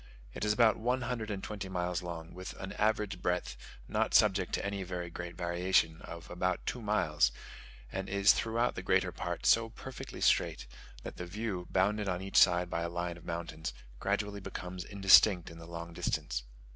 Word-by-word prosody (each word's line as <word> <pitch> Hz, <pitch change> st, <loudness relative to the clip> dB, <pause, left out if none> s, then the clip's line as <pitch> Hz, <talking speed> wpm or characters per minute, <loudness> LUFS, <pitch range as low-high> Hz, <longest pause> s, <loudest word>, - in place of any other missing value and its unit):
It -, -, -5 dB
is 105 Hz, -, +3 dB
about 110 Hz, 0 st, +4 dB
one 125 Hz, +3 st, 0 dB
hundred 120 Hz, -3 st, -3 dB
and 100 Hz, -2 st, -4 dB
twenty 100 Hz, -3 st, -5 dB
miles 90 Hz, -1 st, -1 dB
long, 85 Hz, -2 st, -7 dB
with 95 Hz, +1 st, -7 dB
an 95 Hz, 0 st, -7 dB
average 105 Hz, -3 st, 0 dB
breadth, 90 Hz, -8 st, -1 dB, 0.3 s
not -, -, 0 dB
subject 95 Hz, -4 st, +4 dB
to -, -, -1 dB
any 100 Hz, 0 st, -2 dB
very 90 Hz, -2 st, -4 dB
great 85 Hz, 0 st, -6 dB
variation, 85 Hz, -2 st, +1 dB
of 85 Hz, 0 st, -9 dB
about 90 Hz, +1 st, -1 dB
two 125 Hz, -, -3 dB
miles; 85 Hz, -, +2 dB, 0.6 s
and 95 Hz, 0 st, -4 dB
is 100 Hz, 0 st, +5 dB
throughout 115 Hz, +2 st, 0 dB
the -, -, -5 dB
greater -, -, +2 dB
part -, -, -4 dB
so 115 Hz, 0 st, +5 dB
perfectly 130 Hz, +3 st, -8 dB
straight, -, -, +2 dB, 0.4 s
that -, -, -7 dB
the 90 Hz, -, -5 dB
view, 95 Hz, -2 st, -4 dB
bounded 100 Hz, +2 st, +1 dB
on 90 Hz, -1 st, -1 dB
each 95 Hz, +1 st, -2 dB
side 90 Hz, -1 st, +6 dB
by 85 Hz, -1 st, -2 dB
a 85 Hz, -, -2 dB
line 85 Hz, 0 st, -3 dB
of 85 Hz, -, -14 dB
mountains, 80 Hz, -5 st, -4 dB, 0.2 s
gradually 100 Hz, +1 st, -1 dB
becomes 90 Hz, -1 st, -6 dB
indistinct 95 Hz, -2 st, +5 dB
in 85 Hz, -, -11 dB
the 85 Hz, -, -10 dB
long 85 Hz, 0 st, -7 dB
distance. -, -, -2 dB
95 Hz, 185 wpm, -32 LUFS, 85-105 Hz, 0.6 s, side